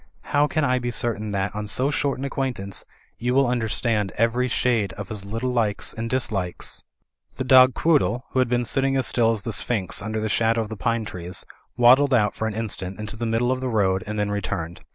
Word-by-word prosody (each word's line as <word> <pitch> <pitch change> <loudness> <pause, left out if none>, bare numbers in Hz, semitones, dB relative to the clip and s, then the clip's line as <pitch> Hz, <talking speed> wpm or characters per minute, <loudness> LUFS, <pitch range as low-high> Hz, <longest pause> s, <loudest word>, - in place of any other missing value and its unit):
How 145 +1 +4
can 155 +1 0
I 130 -1 +2
be 120 0 -3
cer 120 0 +1
tain 105 0 -6
that, 100 0 -2
on 105 0 -4
so 130 +7 +1
short 140 -2 0
an 135 - -4
acquaintance, 125 -9 -3 0.3
you 125 +2 0
will 135 0 +5
imder 120 -3 -1
stand 105 -4 0
every 115 +3 +2
shade 115 -5 0
of 100 -2 -8
his 105 -3 -5
little 115 +5 -2
likes 110 -4 0
and 115 0 -4
dislikes?'* 105 -8 -2 0.5
The - - -3
dog 130 -1 +6
Quoodle, 145 -6 +2
who 130 - 0
had 130 -2 +2
been 120 0 +1
sitting 135 +2 +1
as 130 - +1
still 115 -2 +3
as 110 -3 -2
the 115 - -3
sphinx 100 -3 +1
under 110 +2 -3
the 110 - -1
shadow 115 +1 +2
of 110 - -5
the 110 - -5
pine 115 +1 -1
trees, 90 -2 -4 0.3
waddled 130 +3 +6
out 105 -3 +2
for 110 - -3
an 105 - -4
instant 100 -4 -2
into 105 0 -5
the 115 +1 -3
middle 115 +2 +1
of 130 0 -1
the 130 - -2
road 95 -4 +1
and 105 0 -4
then 105 0 0
returned. 85 -4 -4
115 Hz, 230 wpm, -23 LUFS, 105-125 Hz, 0.5 s, dog